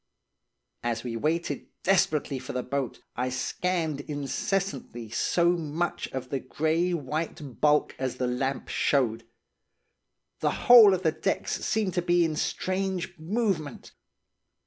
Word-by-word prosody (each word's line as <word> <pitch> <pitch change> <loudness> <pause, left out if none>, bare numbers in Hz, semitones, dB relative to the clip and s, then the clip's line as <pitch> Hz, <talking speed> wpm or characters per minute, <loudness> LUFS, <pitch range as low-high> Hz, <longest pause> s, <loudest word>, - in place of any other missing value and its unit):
"As 120 -1 -2
we 120 -2 -4
waited 160 +8 -1 0.2
desperately 155 -7 +2
for - - -7
the 125 0 -2
boat, 135 -1 -3
I 125 +1 -1
scanned 160 +4 -1
incessantly 145 - -3
so 170 +7 +2
much 170 0 -2
of 130 -1 -6
the 135 - -1
grey 160 +7 0
white 150 -4 -4
bulk 150 0 +3
as 130 -1 -2
the 130 - -1
lamp 130 +2 -2
showed. 115 -5 +1 1.1
The - - -1
whole 225 -5 +9
of 185 - -6
the 160 - +3
decks - - -2
seemed 210 -5 0
to 175 - +1
be 175 0 +3
in 155 -1 -1
strange 185 +2 -2
movement. 170 - -2
155 Hz, 130 wpm, -27 LUFS, 130-175 Hz, 1.1 s, whole